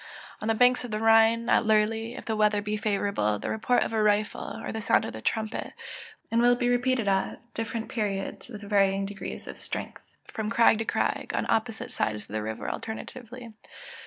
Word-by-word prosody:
On 215 - -3
the 225 - +2
banks 250 +2 +4
of 245 - -6
the 215 - -2
Rhine, 225 +1 +4
at - - +4
Lurley, 220 +1 +1
if - - -8
the 220 - -1
weather 210 -1 +3
be 210 +1 -2
favourable, 200 - 0
the - - -4
report 245 +3 +2
of - - -4
a 220 - +2
rifle, 210 +1 0
or - - -4
the 220 - -4
sound 230 +2 +3
of 110 - -6
a 110 - -7
trumpet, 220 - -2 0.6
will 240 +1 +4
be 245 0 0
repeated 245 -2 +1
at 195 -1 0
different 225 0 -3
periods, 205 -1 -3
and 215 -4 -7
with 205 - -10
various 195 -1 +3
degrees 200 0 -7
of - - -7
strength, - - -5 0.2
from 215 -1 -4
crag 230 -1 +5
to 225 - -1
crag, - - -1
on - - 0
opposite 225 0 -1
sides 105 -1 -1
of - - -22
the 110 +1 -2
river 110 +1 -5
alternately. 235 +1 -7
220 Hz, 200 wpm, -27 LUFS, 205-230 Hz, 0.6 s, crag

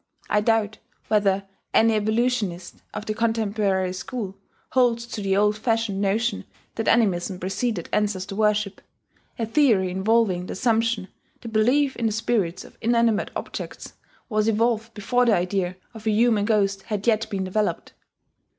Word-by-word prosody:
(I 210 - +3
doubt 220 -1 +1 0.3
whether 200 -2 +2 0.3
any 225 0 +5
evolutionist 215 -4 -1
of 210 - -6
the 215 - -1
contemporary 210 -4 0
school 195 +1 -5 0.4
holds 240 -2 +2
to 230 -3 -6
the 195 -1 +1
old 210 +1 +3
fashioned 225 -4 0
notion 215 +4 0 0.3
that 225 - -3
animism 190 -5 +2
preceded 195 0 -2
ancestor 200 -2 -1
worship, 210 -2 +1 0.6
a 230 - -1
theory 220 -7 +3
involving 190 -2 +1
the - - -4
assumption 225 -2 +1 0.3
that 230 - -7
belief 260 +6 +3
in 230 - 0
the - - 0
spirits 210 -5 -1
of - - -17
inanimate 230 -2 +2
objects - - -6 0.3
was 215 -1 0
evolved 225 0 +1
before 245 +4 +1
the 220 - +5
idea 180 0 -1 0.2
of 220 -1 -8
a - - +4
human 215 -1 +3
ghost 200 -3 +1
had 210 -1 -4
yet 225 -2 +2
been 195 -2 -2
developed.) 205 +3 -2
215 Hz, 150 wpm, -24 LUFS, 195-230 Hz, 0.6 s, any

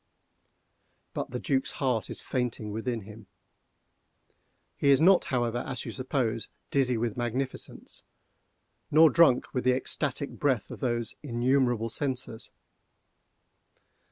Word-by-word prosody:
But - - -3
the 125 - -4
Duc's 135 +1 -1
heart 125 -5 -1
is - - -6
fainting 120 -4 -2
within 115 +2 -3
him. 105 0 -12 1.5
He 140 - +1
is 135 - +6
not, 185 +3 +5
however, 120 -5 0
as 125 0 -5
you - - -4
suppose, 130 -4 -2 0.2
dizzy 125 -3 +2
with 115 -1 -1
magnificence, 125 +2 -4 0.9
nor 160 +1 +7
drunk 165 -7 +4
with 125 - -1
the 125 0 +3
ecstatic 140 +1 -1
breath 130 -7 0
of - - -8
those 120 -4 -1
innumerable 120 -3 +1
censers. 130 -4 -2
125 Hz, 120 wpm, -28 LUFS, 115-135 Hz, 1.5 s, nor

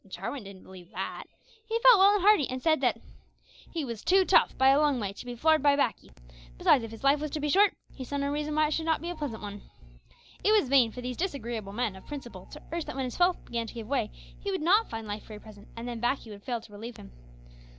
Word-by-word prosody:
Jarwin 195 +8 -5
didn't 195 -1 -11
believe 180 -2 -13
that. - - -5 0.4
He 445 +1 -1
felt 480 -3 +7
well 400 +2 +6
and 400 - 0
hearty, 410 -9 +5
and 255 0 -3
said 315 +3 +2
that - - +1 0.7
he 325 -4 -3
"was 230 -4 -6
too 380 +1 +4
tough, - - +4
by 265 0 +5
a 275 +2 +5
long 295 -4 +2
way, 200 -3 -3
to 200 - -10
be 245 - -5
floored 315 +5 +3
by 285 0 +4
baccy; 280 -5 -1 0.5
besides, 250 - +4
if 225 - -6
his 225 +3 -11
life 280 +2 +4
was 305 +1 -3
to 305 - -4
be 295 0 -1
short, 400 +6 +4 0.2
he 265 - -7
saw 285 +3 -4
no 280 0 -1
reason 300 +1 -2
why 310 0 +4
it 300 - -2
should 320 +1 -2
not 320 - +2
be 345 - -3
a - - -6
pleasant 285 -9 -5
one." 205 0 -7 0.8
It 425 - +4
was 410 -12 +3
vain 255 -4 +5
for 250 - -8
these 250 0 -5
disagreeable 235 - -4
men 225 -3 -1
of 190 - -14
principle 240 -10 -8
to - - -12
urge 335 -1 -3
that - - -7
when 265 -1 -2
his 250 - -6
health 355 0 +2
began 230 -1 -3
to - - -9
give 230 -2 -6
way 250 -5 0 0.3
he 405 - -5
would 380 -5 -2
not 405 +7 +4
find 225 -1 -6
life 210 0 -6
very 215 -1 -9
pleasant, 210 -1 -14
and 230 +1 -6
then 240 -1 -5
"baccy" 240 -1 -1
would 200 -1 -10
fail 240 +1 -3
to 215 - -16
relieve 225 +3 -8
him. - - -12
265 Hz, 265 wpm, -28 LUFS, 225-315 Hz, 0.8 s, felt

